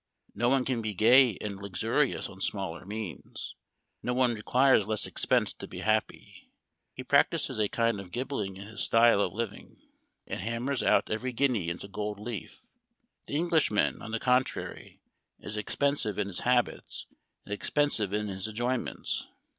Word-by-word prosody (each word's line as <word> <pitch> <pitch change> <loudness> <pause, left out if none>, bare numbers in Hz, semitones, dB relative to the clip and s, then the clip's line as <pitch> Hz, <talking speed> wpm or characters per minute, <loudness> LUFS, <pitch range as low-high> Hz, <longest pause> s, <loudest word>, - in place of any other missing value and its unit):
No 120 +1 +1
one 130 -1 +2
can 125 -3 0
be 110 -2 -3
gay 120 +2 +6
and 100 -2 -4
luxurious 110 +8 0
on 95 0 -12
smaller 95 -3 -2
means; 105 -3 -6 0.5
no 125 - -1
one 125 -2 +3
requires 125 +1 +3
less 110 -1 +1
expense - - +1
to - - -9
be - - -7
happy. 110 0 -2 0.5
He - - -6
practices - - +2
a 105 -2 +2
kind 115 -3 +1
of 95 -2 -9
gilding 120 -7 -3
in 100 - -8
his 110 +1 -3
style 115 -2 +5
of 95 - 0
living, 110 +2 -6 0.5
and - - -5
hammers 120 +6 -1
out - - +3
every 125 +4 -1
guinea 120 -9 +1
into 85 +3 -5
gold 105 +1 -4
leaf. 120 - -7 0.6
The - - -4
Englishman, 160 -9 +2
on - - -7
the 115 +1 -1
contrary, 125 +1 -1 0.4
is 105 - -7
expensive 115 0 0
in 100 -1 -1
his 90 - -4
habits, 125 -1 0 0.4
and 105 - -5
expensive 110 -3 +1
in 105 +1 -1
his 95 0 -4
enjoyments. 120 +3 -2
110 Hz, 160 wpm, -29 LUFS, 100-125 Hz, 0.6 s, gay